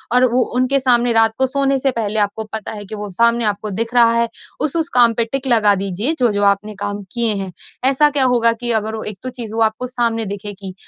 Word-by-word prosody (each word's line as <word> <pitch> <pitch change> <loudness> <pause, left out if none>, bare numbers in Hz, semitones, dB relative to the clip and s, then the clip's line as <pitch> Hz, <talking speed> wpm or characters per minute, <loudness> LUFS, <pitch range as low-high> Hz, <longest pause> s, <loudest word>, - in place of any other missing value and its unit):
और 250 +1 +5
वो 255 - +2
उनके 255 +2 +2
सामने 245 -2 +2
रात 225 -1 +3
को 265 0 +1
सोने 275 0 0
से 270 0 0
पहले 220 -3 -1
आपको 205 +2 -1
पता 220 -2 -4
है 205 -1 -8
कि 215 - -7
वो 205 -1 -7
सामने 235 +3 +1
आपको 210 +1 -2
दिख 230 +1 -4
रहा 235 -1 +5
है, 235 0 0 0.3
उस-उस 315 +2 -1
काम 235 -1 +5
पे 230 +1 +1
टिक 270 +3 -3
लगा 215 -4 +4
दीजिए 200 - -2
जो-जो 205 -5 +1
आपने 210 +1 -11
काम 205 0 -4
किए 235 -3 +1
हैं। 195 -1 -5 0.3
ऐसा 275 +3 +4
क्या 280 -2 +5
होगा 230 -1 +4
कि 240 -1 +3
अगर 220 +1 -4
वो 220 - -6
एक 190 - -15
तो 255 - -3
चीज़ 220 -2 -3
वो 225 - -1
आपको 250 +3 -7
सामने 235 -2 -2
दिखेगी 195 -2 -8
230 Hz, 235 wpm, -17 LUFS, 210-250 Hz, 0.3 s, और